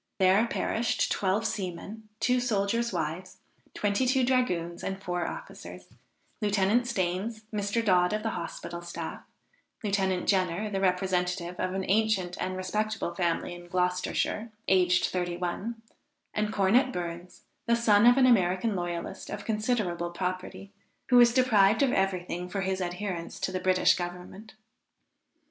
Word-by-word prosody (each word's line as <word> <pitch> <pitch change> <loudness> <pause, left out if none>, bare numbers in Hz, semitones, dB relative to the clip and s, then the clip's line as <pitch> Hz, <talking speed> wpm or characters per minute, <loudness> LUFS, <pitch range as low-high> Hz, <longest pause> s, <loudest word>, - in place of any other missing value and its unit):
There 195 +4 +4
perished, 230 0 0
twelve 200 +3 0
seamen, 205 +1 -5
two 250 +2 +2
soldiers' 230 0 0
wives, 175 +2 -4 0.4
twenty 205 +5 +1
two 260 0 +3
dragoons 180 -10 0
and 195 0 -3
four 180 -2 -2
officers, - - -9 0.5
Lieutenant 205 +3 +2
Stains, 205 +1 -2
Mr. 210 +2 -1
Dodd 180 -3 +4
of 215 0 -2
the 225 - -1
hospital 170 0 -6
staff, 175 0 -6 0.6
Lieutenant 190 -3 0
Jenner, 190 +2 +1
the 195 -1 -1
representative 180 -1 0
of 185 0 -1
an 190 0 -2
ancient 195 -3 +1
and 185 0 -2
respectable 210 0 -2
family 175 0 -1
in 175 0 -11
Gloucestershire, 180 +5 -1 0.2
aged 180 -1 +4
thirty 175 -1 -2
one 210 +6 -4 0.5
and 210 0 -1
Cornet 220 +7 +3
Burns, 175 -1 -6 0.2
the 235 - +4
son 230 -1 +5
of 245 +1 +7
an 265 - +6
American 195 -2 +3
loyalist 175 -1 -4
of - - -6
considerable 210 -6 -1
property, 185 +2 -5 0.4
who 250 - +6
was 240 -1 +7
deprived 225 -3 +4
of 265 - +3
every 190 -2 +1
thing 180 0 -5
for 195 +2 -2
his 190 0 -1
adherence 180 -1 -4
to - - -2
the 185 - -2
British 185 0 +4
Government. 180 +5 -7
190 Hz, 145 wpm, -28 LUFS, 180-220 Hz, 0.6 s, of